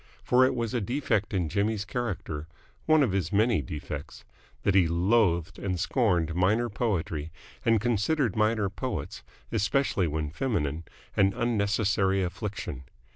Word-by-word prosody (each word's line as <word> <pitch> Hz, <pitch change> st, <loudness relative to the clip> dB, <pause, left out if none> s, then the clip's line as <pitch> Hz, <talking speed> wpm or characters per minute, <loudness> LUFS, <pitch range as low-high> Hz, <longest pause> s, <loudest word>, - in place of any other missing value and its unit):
For 125 Hz, +1 st, +4 dB
it 130 Hz, 0 st, +3 dB
was 115 Hz, -1 st, -2 dB
a 120 Hz, -, 0 dB
defect 115 Hz, -2 st, 0 dB
in 90 Hz, -4 st, 0 dB
Jimmy's 100 Hz, +3 st, 0 dB
character 100 Hz, -10 st, -4 dB, 0.4 s
one 155 Hz, -2 st, +5 dB
of 120 Hz, -, +1 dB
his 95 Hz, -4 st, -1 dB
many 105 Hz, -3 st, +3 dB
defects 75 Hz, +1 st, -7 dB, 0.4 s
that 100 Hz, -, +2 dB
he 95 Hz, -3 st, +5 dB
loathed 85 Hz, -1 st, +2 dB
and 90 Hz, -3 st, -2 dB
scorned 90 Hz, -, +1 dB
minor 105 Hz, +7 st, +2 dB
poetry 85 Hz, -8 st, -2 dB, 0.3 s
and 115 Hz, -1 st, +4 dB
considered 120 Hz, -, +1 dB
minor 110 Hz, -1 st, +2 dB
poets, 95 Hz, -, -5 dB, 0.3 s
especially 105 Hz, -3 st, +1 dB
when 75 Hz, -1 st, -2 dB
feminine, 85 Hz, -, -2 dB, 0.3 s
an 95 Hz, -1 st, +3 dB
unnecessary 100 Hz, -4 st, +1 dB
affliction. 90 Hz, -, -5 dB
100 Hz, 135 wpm, -28 LUFS, 85-115 Hz, 0.4 s, one